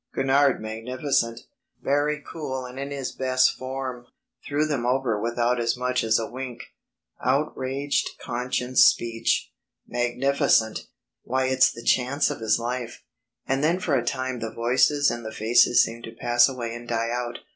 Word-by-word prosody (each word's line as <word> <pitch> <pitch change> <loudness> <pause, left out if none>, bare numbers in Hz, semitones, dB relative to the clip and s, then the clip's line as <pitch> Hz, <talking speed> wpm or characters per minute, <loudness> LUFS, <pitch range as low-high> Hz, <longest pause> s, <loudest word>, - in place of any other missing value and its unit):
Gurnard 135 0 +3
magnificent. 115 +2 -2 0.4
Very 145 +1 0
cool 130 -5 -5
and 125 +1 -9
in 140 0 -4
his 140 -2 -4
best 130 -1 +2
form. 130 -2 -6 0.4
Threw 145 +1 +1
them 145 -6 -2
over 125 -4 0
without 120 +1 0
as 115 +1 0
much 125 0 0
as 110 0 +3
a 115 - -2
wink. 125 0 -7 0.6
Outraged 135 0 0
conscience 125 +1 +1
speech. 115 -1 +2 0.4
Magnificent. 120 -2 +1 0.3
Why 130 +1 -1
it's 130 0 +4
the 115 - -10
chance 130 +3 +2
of - - -5
his 110 -1 +2
life."... 120 0 -5 0.4
And 135 +2 0
then 170 +4 +2
for 165 -5 -1
a 125 -3 +2
time 130 0 -2
the 115 0 -4
voices 130 +5 +2
and 120 0 -5
the 110 - -6
faces 120 +2 +4
seemed 115 +1 -6
to 115 - -9
pass 120 +1 +4
away 120 -3 -5
and 120 0 -9
die 115 0 -1
out. 120 0 -3
125 Hz, 155 wpm, -25 LUFS, 120-135 Hz, 0.6 s, it's